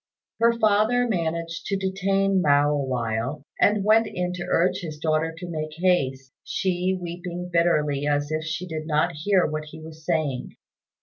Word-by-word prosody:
Her 235 Hz, +1 st, +5 dB
father 220 Hz, +3 st, +3 dB
managed 170 Hz, -4 st, -2 dB
to 200 Hz, -, 0 dB
detain 195 Hz, 0 st, +1 dB
Mao 145 Hz, -1 st, +4 dB
awhile, 130 Hz, 0 st, -2 dB
and 205 Hz, -1 st, +3 dB
went 220 Hz, +2 st, +4 dB
in 180 Hz, -2 st, -3 dB
to 180 Hz, -1 st, -5 dB
urge 180 Hz, +2 st, +2 dB
his 160 Hz, -5 st, -6 dB
daughter 155 Hz, +1 st, 0 dB
to 180 Hz, +1 st, -7 dB
make 155 Hz, -2 st, -4 dB
haste, 135 Hz, -7 st, 0 dB
she 185 Hz, -1 st, -1 dB
weeping 175 Hz, 0 st, -6 dB
bitterly 150 Hz, -4 st, +2 dB
as 145 Hz, 0 st, 0 dB
if 155 Hz, 0 st, -1 dB
she 165 Hz, +3 st, -3 dB
did 160 Hz, -3 st, -5 dB
not 155 Hz, -1 st, +2 dB
hear 185 Hz, +5 st, +2 dB
what 155 Hz, 0 st, -3 dB
he 155 Hz, +1 st, -11 dB
was 160 Hz, 0 st, -11 dB
saying. 155 Hz, -6 st, -1 dB
170 Hz, 165 wpm, -24 LUFS, 150-185 Hz, -, Her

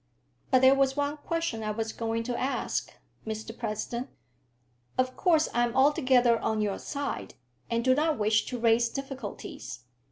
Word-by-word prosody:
"But 255 Hz, -3 st, +4 dB
there 260 Hz, +1 st, +8 dB
was 275 Hz, 0 st, +2 dB
one 285 Hz, +1 st, 0 dB
question 330 Hz, -6 st, -2 dB
I 215 Hz, -, -2 dB
was 220 Hz, +1 st, -3 dB
going 230 Hz, 0 st, -2 dB
to 245 Hz, +1 st, -3 dB
ask, 260 Hz, +3 st, -2 dB, 0.3 s
Mr 220 Hz, +1 st, -5 dB
President. 235 Hz, +2 st, -4 dB, 0.9 s
Of 255 Hz, 0 st, +1 dB
course 325 Hz, -4 st, +3 dB
I 240 Hz, -, +3 dB
am 240 Hz, 0 st, -1 dB
altogether 260 Hz, -4 st, +4 dB
on 220 Hz, -1 st, -1 dB
your 205 Hz, -2 st, -1 dB
side, 285 Hz, -1 st, -4 dB, 0.3 s
and 230 Hz, +1 st, 0 dB
do 260 Hz, -, +6 dB
not 305 Hz, +2 st, +1 dB
wish 215 Hz, +1 st, +2 dB
to 250 Hz, -, -3 dB
raise 230 Hz, 0 st, +3 dB
difficulties. 265 Hz, -, -7 dB
245 Hz, 160 wpm, -28 LUFS, 225-275 Hz, 0.9 s, there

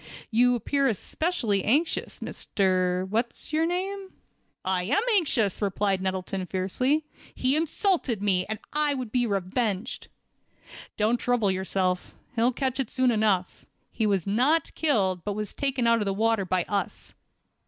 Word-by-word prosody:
"You 245 Hz, +2 st, +4 dB
appear 275 Hz, +4 st, +1 dB
especially 230 Hz, -, 0 dB
anxious, 300 Hz, +9 st, 0 dB
Mr. 185 Hz, -1 st, 0 dB
What's 235 Hz, +8 st, -2 dB
your 320 Hz, +1 st, +2 dB
name?" 380 Hz, +2 st, -3 dB, 0.5 s
"I 185 Hz, -1 st, +1 dB
am 265 Hz, -, +1 dB
anxious," 245 Hz, -, +1 dB
replied 200 Hz, -1 st, 0 dB
Nettleton, 190 Hz, 0 st, -3 dB
fiercely. 255 Hz, -, 0 dB, 0.3 s
"He 260 Hz, +2 st, +2 dB
insulted 320 Hz, -, +1 dB
me, 195 Hz, -3 st, +2 dB
and 220 Hz, +1 st, -3 dB, 0.2 s
I 300 Hz, -1 st, +2 dB
would 250 Hz, -5 st, -5 dB
be 245 Hz, 0 st, +1 dB
revenged." 200 Hz, +2 st, -2 dB, 0.9 s
"Don't 220 Hz, +3 st, +2 dB
trouble 235 Hz, -5 st, +1 dB
yourself. 185 Hz, -1 st, -1 dB, 0.2 s
He'll 235 Hz, +2 st, +3 dB
catch 260 Hz, +1 st, -2 dB
it 260 Hz, -4 st, -1 dB
soon 255 Hz, -1 st, +2 dB
enough. 210 Hz, -5 st, 0 dB, 0.2 s
He 220 Hz, -2 st, 0 dB
was 195 Hz, -4 st, +1 dB
not 255 Hz, +11 st, +2 dB
killed, 195 Hz, -, +1 dB
but 205 Hz, -, -2 dB
was 210 Hz, -1 st, -4 dB
taken 270 Hz, -3 st, -1 dB
out 230 Hz, 0 st, +4 dB
of 210 Hz, -, -1 dB
the 195 Hz, -1 st, -1 dB
water 225 Hz, -1 st, +1 dB
by 180 Hz, -1 st, +1 dB
us." 200 Hz, +2 st, -3 dB
220 Hz, 145 wpm, -26 LUFS, 195-270 Hz, 0.9 s, You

